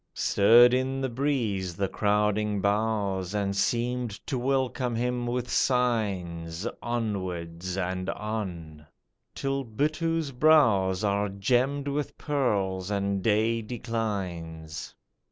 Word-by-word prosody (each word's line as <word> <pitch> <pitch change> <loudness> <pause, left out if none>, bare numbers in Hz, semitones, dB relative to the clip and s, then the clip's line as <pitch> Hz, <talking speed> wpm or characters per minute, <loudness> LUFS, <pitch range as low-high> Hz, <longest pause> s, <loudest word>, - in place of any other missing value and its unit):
Stirred 120 +4 +6
in 130 +1 0
the 135 -1 -1
breeze 115 -9 -1
the 100 +2 0
crowding 105 +1 +1
boughs, 100 -2 0
And 100 -1 0
seemed 120 +3 0 0.2
to - - -2
welcome 130 -1 0
him 125 +1 -1
with 125 0 -2
signs, 100 -10 0 0.2
Onwards 95 -6 -3
and 95 0 -2
on, 85 -8 -5 0.5
till 135 0 -1
Buttoo's 155 +6 -1
brows 115 -10 +4
Are 100 0 +1
gemmed 125 +8 0
with 145 +1 -3
pearls, 100 -10 -1
and 100 -1 -1
day 110 +3 +2
declines. 100 -9 -4
105 Hz, 105 wpm, -27 LUFS, 95-125 Hz, 0.5 s, Stirred